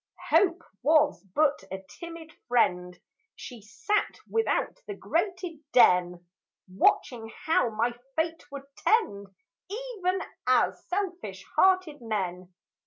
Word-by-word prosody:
Hope 345 Hz, +1 st, +3 dB, 0.2 s
Was 300 Hz, +1 st, +3 dB
but 295 Hz, -7 st, +2 dB
a 190 Hz, 0 st, -6 dB
timid 335 Hz, -2 st, -10 dB
friend; 180 Hz, -7 st, +1 dB, 0.4 s
She 245 Hz, -4 st, -10 dB
sat 410 Hz, -, -1 dB
without 455 Hz, +2 st, 0 dB
the 410 Hz, -, -5 dB
grated 355 Hz, -2 st, -2 dB
den, 180 Hz, -6 st, +4 dB, 0.4 s
Watching 225 Hz, +4 st, +1 dB
how 320 Hz, -6 st, +3 dB
my 230 Hz, +2 st, 0 dB, 0.2 s
fate 325 Hz, +1 st, -1 dB
would 280 Hz, -1 st, -7 dB
tend, 200 Hz, -, +1 dB, 0.4 s
Even 410 Hz, -5 st, -2 dB, 0.3 s
as -, -, +2 dB
selfish 355 Hz, -, -4 dB
hearted 370 Hz, -7 st, +3 dB
men. 185 Hz, -5 st, -3 dB
300 Hz, 105 wpm, -28 LUFS, -, 0.4 s, den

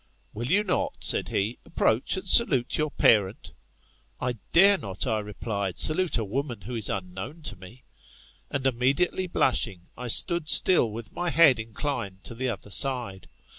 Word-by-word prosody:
Will 120 Hz, +3 st, -5 dB
you 200 Hz, +8 st, +2 dB
not, 185 Hz, -3 st, -2 dB
said -, -, +2 dB
he, 105 Hz, +5 st, -3 dB
ap -, -, -21 dB
aproach 115 Hz, -, +1 dB
and 190 Hz, -, -7 dB
salute 140 Hz, -, +3 dB
your 155 Hz, 0 st, -1 dB
parent 105 Hz, -, +1 dB, 0.6 s
"fl -, -, -6 dB
I 125 Hz, -, -1 dB, 0.2 s
dare 195 Hz, +3 st, +6 dB
not, 95 Hz, -1 st, -5 dB
I 110 Hz, -4 st, -1 dB
replied, 105 Hz, -2 st, -5 dB
salute 170 Hz, +1 st, +3 dB
a 115 Hz, -, -2 dB
woman 120 Hz, +1 st, -4 dB
who 120 Hz, +8 st, -8 dB
is 110 Hz, -4 st, -1 dB
unknown 95 Hz, -, -7 dB
to 105 Hz, -, -7 dB
me. 100 Hz, +8 st, -15 dB, 0.7 s
And 135 Hz, -2 st, -4 dB
immediately 135 Hz, +9 st, 0 dB
blushing, 95 Hz, -, -1 dB
I 125 Hz, -, -7 dB
stood 170 Hz, -, +4 dB
still 175 Hz, -11 st, +5 dB
with 110 Hz, +1 st, -9 dB
my 175 Hz, 0 st, -3 dB
head 155 Hz, -7 st, +4 dB
inclined 110 Hz, -4 st, -5 dB
to -, -, -7 dB
the 130 Hz, +2 st, -3 dB
other 105 Hz, -3 st, -7 dB
side. 120 Hz, -4 st, 0 dB
120 Hz, 170 wpm, -25 LUFS, 105-155 Hz, 0.7 s, dare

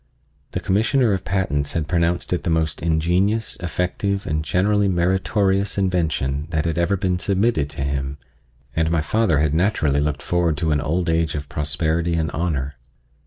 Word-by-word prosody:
The -, -, -1 dB
Commissioner 110 Hz, +4 st, +2 dB
of 95 Hz, -, -2 dB
Patents 75 Hz, -7 st, -1 dB
had 80 Hz, -3 st, -1 dB
pronounced 85 Hz, +1 st, 0 dB
it 90 Hz, -, 0 dB
the -, -, -2 dB
most 80 Hz, -2 st, 0 dB
ingenious, 90 Hz, +7 st, +1 dB
effective 90 Hz, +3 st, -2 dB
and 75 Hz, +1 st, -1 dB
generally 100 Hz, +6 st, +2 dB
meritorious 95 Hz, +2 st, +1 dB
invention 80 Hz, -7 st, 0 dB
that 80 Hz, -1 st, -1 dB
had 80 Hz, 0 st, -1 dB
ever 95 Hz, +4 st, +1 dB
been 90 Hz, -1 st, 0 dB
submitted 95 Hz, -6 st, +1 dB
to 70 Hz, -, -5 dB
him, 70 Hz, 0 st, -2 dB, 0.6 s
and 80 Hz, 0 st, +1 dB
my 85 Hz, -1 st, +1 dB
father 95 Hz, +1 st, +1 dB
had 75 Hz, 0 st, +1 dB
naturally 80 Hz, -5 st, +2 dB
looked 75 Hz, -1 st, -2 dB
forward 85 Hz, -1 st, +1 dB
to 80 Hz, +1 st, 0 dB
an 75 Hz, -1 st, +1 dB
old 85 Hz, +4 st, -1 dB
age 80 Hz, -1 st, +1 dB
of 75 Hz, -1 st, -5 dB
prosperity 80 Hz, +2 st, 0 dB
and 80 Hz, -3 st, -1 dB
honor. 70 Hz, -5 st, -2 dB
85 Hz, 165 wpm, -22 LUFS, 75-95 Hz, 0.6 s, Commissioner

